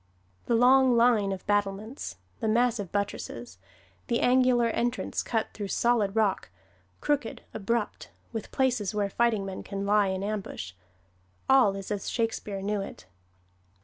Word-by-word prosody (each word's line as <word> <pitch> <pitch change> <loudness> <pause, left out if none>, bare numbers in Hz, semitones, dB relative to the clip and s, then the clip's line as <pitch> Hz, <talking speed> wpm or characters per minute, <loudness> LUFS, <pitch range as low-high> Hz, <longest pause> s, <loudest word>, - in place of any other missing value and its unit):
The 235 - +3
long 255 +1 +5
line 230 -4 +4
of 190 -1 -5
battlements, 205 +4 -2 0.2
the - - -1
massive 225 -4 +1
buttresses, 120 - -4 0.5
the 235 - +1
angular 250 -1 +4
entrance 240 +2 -1
cut 225 -2 -1
through 205 -2 -5
solid 220 -2 +1
rock, 215 -4 +1 0.5
crooked, 285 -6 -1
abrupt, 220 +1 -2 0.2
with 225 -2 -5
places 240 -7 0
where 200 -1 0
fighting 225 -3 +1
men 190 -1 -5
can 200 0 -5
lie 205 0 +3
in 190 0 -2
ambush, 200 - -4 0.8
all 255 -7 +5
is 195 +1 -6
as 205 -2 -2
Shakespeare 215 -4 -2
knew 205 0 -1
it. 195 - -8
215 Hz, 140 wpm, -28 LUFS, 195-240 Hz, 0.8 s, long